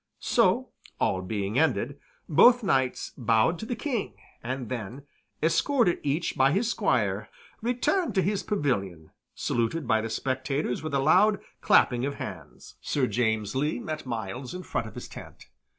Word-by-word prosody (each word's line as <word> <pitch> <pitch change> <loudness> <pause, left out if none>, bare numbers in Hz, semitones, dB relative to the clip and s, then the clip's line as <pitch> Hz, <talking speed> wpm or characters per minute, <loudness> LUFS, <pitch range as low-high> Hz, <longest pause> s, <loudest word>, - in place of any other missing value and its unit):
So, - - +2 0.3
all 95 - +1
being 100 +4 -2
ended, 140 -2 0 0.3
both 240 - +6
knights 130 -9 0
bowed 120 +6 +2
to 220 - -6
the 245 - -2
King, 240 -2 -3 0.3
and 125 +1 -4
then, 125 +2 -6 0.4
escorted 185 - +2
each 150 +4 -1
by 135 +2 +4
his 220 +5 +1
squire, 110 - 0 0.3
returned 250 - 0
to 190 - +3
his 200 0 0
pavilion, 100 - -2 0.2
saluted 120 +5 -1
by 110 -1 +3
the 115 - -4
spectators 130 +2 -2
with 155 -2 -3
a - - +3
loud 190 +9 +4 0.2
clapping 125 -1 +4
of 140 +1 -2
hands. - - -9
Sir 140 -3 0
James 110 -4 0
Lee 150 +4 0
met 155 -4 -5
Myles 120 - -5
in 185 - -6
front - - -3
of - - -12
his - - -7
tent. - - -12
135 Hz, 155 wpm, -27 LUFS, 115-175 Hz, 0.4 s, both